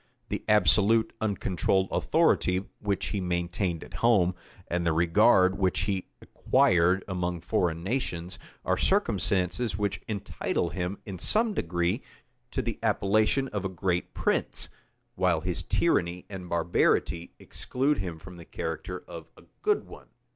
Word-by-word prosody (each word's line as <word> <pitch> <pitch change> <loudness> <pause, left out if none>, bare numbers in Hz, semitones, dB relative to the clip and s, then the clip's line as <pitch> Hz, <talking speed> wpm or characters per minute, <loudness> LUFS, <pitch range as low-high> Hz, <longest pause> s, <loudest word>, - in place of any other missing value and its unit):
The - - -3
absolute, 105 +3 +4
uncontrolled 95 -2 0
authority 90 +2 +2
which 100 -2 -1
he 100 - -2
maintained 85 0 -2
at - - -13
home, 100 -7 +4 0.3
and 90 0 -1
the 85 -1 +2
regard 95 +3 +4
which 95 -2 +1
he 95 -1 -2 0.2
acquired 90 +2 +3
among 90 -2 -2
foreign 85 -1 0
nations, 95 -6 -3 0.3
are - - +1
circumstances 95 +3 +1
which 100 -1 -2
entitle 100 -4 -2
him, 90 +3 -3
in 95 -4 -7
some 220 - +1
degree, 85 - -1 0.5
to - - -2
the - - -4
appellation 110 +7 +2
of 105 -2 -3
a 95 - -1
great 90 -1 -2
prince; - - 0 0.4
while 90 -3 +1
his 90 +1 -2
tyranny 85 +1 0
and 90 -2 -7
barbarity 85 0 +1
exclude 135 +3 -1
him 90 -4 -4
from 85 +3 -12
the 85 - -10
character 80 +4 -5
of - - -9
a - - -16 0.2
good 420 0 +2
one. - - -13
90 Hz, 140 wpm, -28 LUFS, 85-100 Hz, 0.5 s, absolute